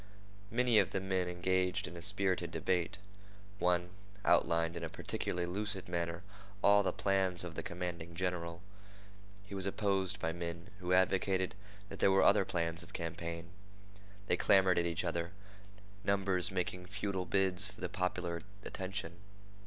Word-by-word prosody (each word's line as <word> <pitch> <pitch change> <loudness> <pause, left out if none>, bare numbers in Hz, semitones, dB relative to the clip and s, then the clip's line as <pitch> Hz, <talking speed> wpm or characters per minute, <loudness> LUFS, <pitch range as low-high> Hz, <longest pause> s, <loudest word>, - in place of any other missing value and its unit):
Many 120 -1 +4
of 95 - +3
the 95 - +1
men 95 -1 0
engaged 90 +1 +1
in 80 - -8
a 85 - -7
spirited 95 0 +1
debate. 90 +1 0 0.6
One 90 0 +2 0.3
outlined 85 0 +3
in 85 - -4
a 80 - -2
peculiarly 90 +2 -2
lucid 100 +1 -3
manner 85 0 -2 0.4
all 100 0 +7
the 100 - +1
plans 95 -3 +1
of 90 -2 -5
the - - -4
commanding 85 -1 -5
general. 90 -1 -2 0.8
He 100 - -10
was 95 0 -1
opposed 100 -1 0
by 80 - -1
men 85 +3 -5
who 90 -1 -3
advocated 95 0 +3 0.4
that - - -8
there - - +5
were 95 0 +5
other 100 -1 +6
plans 85 -1 -1
of 85 - -10
campaign. 85 0 -4 0.7
They 90 - +2
clamored 95 -2 +5
at 85 - +1
each 85 +2 -1
other, 85 +1 -2 0.7
numbers 95 -2 +2
making 90 -1 -2
futile 100 -1 -2
bids 95 -1 +2
for 105 - -13
the - - -2
popular 85 -2 -2 0.2
attention. 95 -3 -4
90 Hz, 155 wpm, -34 LUFS, 85-95 Hz, 0.8 s, all